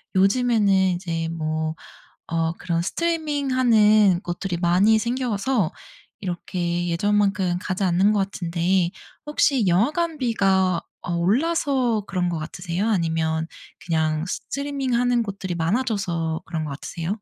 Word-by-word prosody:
요즘에는 210 +1 +3
이제 175 -3 +1
뭐 155 -1 -2 0.6
어 165 0 +1
그런 170 -2 -1
스트리밍 305 - -1
하는 215 -7 +4
곳들이 175 +1 -3
많이 185 +6 +3
생겨서 235 -4 0 0.5
이렇게 175 -1 -2
예전만큼 195 0 +1
가지 190 -1 -3
않는 190 +3 +3
것 205 - +1
같은데 175 -1 0 0.4
혹시 275 -6 +2
영화관비가 205 - +1 0.2
어 175 - -4
올라서 250 - +1
그런 180 -2 -1
것 170 -2 -2
같으세요? 175 +5 -3
아니면 160 -4 0 0.4
그냥 160 -1 0
스트리밍 275 +4 -3
하는 245 -1 +2
곳들이 190 -3 -5
많아져서 170 -4 -1
그런 160 -2 -3
것 150 - -5
같으세요? 165 +4 -6
190 Hz, 285 characters per minute, -23 LUFS, 170-230 Hz, 0.6 s, 하는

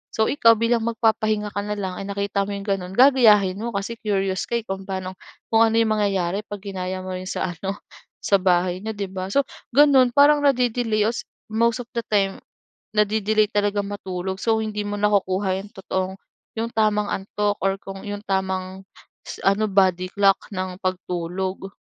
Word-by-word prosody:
So, 220 -1 +2
ikaw 230 -5 +5
bilang 230 +1 +1
magpapahinga 215 -2 +1
ka 205 - -3
na 210 - -2
lang 190 -3 -4
ay 195 - -6
nakita 200 0 -1
mo 205 - -3
'yong 200 - -6
gano'n, 195 -2 -3
gagayahin 215 -7 +5
mo 235 0 -4
kasi 215 +4 -4
curious 195 -3 -1
ka 235 - -2
eh, 235 - -1
kung 195 -1 -6
paano, 190 -1 -5 0.3
kung 225 0 +5
ano 225 - 0
mangyayari 205 -2 0
pag 205 -1 -8
ginaya 185 -2 -4
mo 185 - -6
rin 185 0 -5
sa 185 - -2
ano, 195 +2 -3 0.5
sa 200 - +3
bahay 180 -1 +1
n'yo, 220 +2 -5
'di 200 -2 -4
ba? 185 -1 -4
So, 280 +9 +2 0.3
gano'n, 270 -4 +5
parang 290 +1 +6
nade-delay 245 -6 +1
os 225 +2 -2 0.2
most 235 +2 +1
of 235 - -31
the 235 - -2
time, 195 -2 +1 0.5
nade-delay 215 0 +2
talagang 205 -1 0
matulog, 190 -2 -4
so 220 +2 +1
hindi 210 -1 -3
mo 205 - -3
nakukuha 195 -2 +1
yung 205 - -16
totoong, 190 -1 -3 0.4
yung 230 +1 -3
tamang 210 -2 +1
antok, 205 +1 -1
or 195 0 +1
kung 195 +1 -9
yung 205 0 -5
tamang 190 -1 -3 0.6
ano, 200 +2 +2
body 185 -2 +2
clock 200 -1 +4 0.2
ng 185 -1 -4
pagtulog. 185 +1 -3
200 Hz, 175 wpm, -23 LUFS, 190-220 Hz, 0.6 s, parang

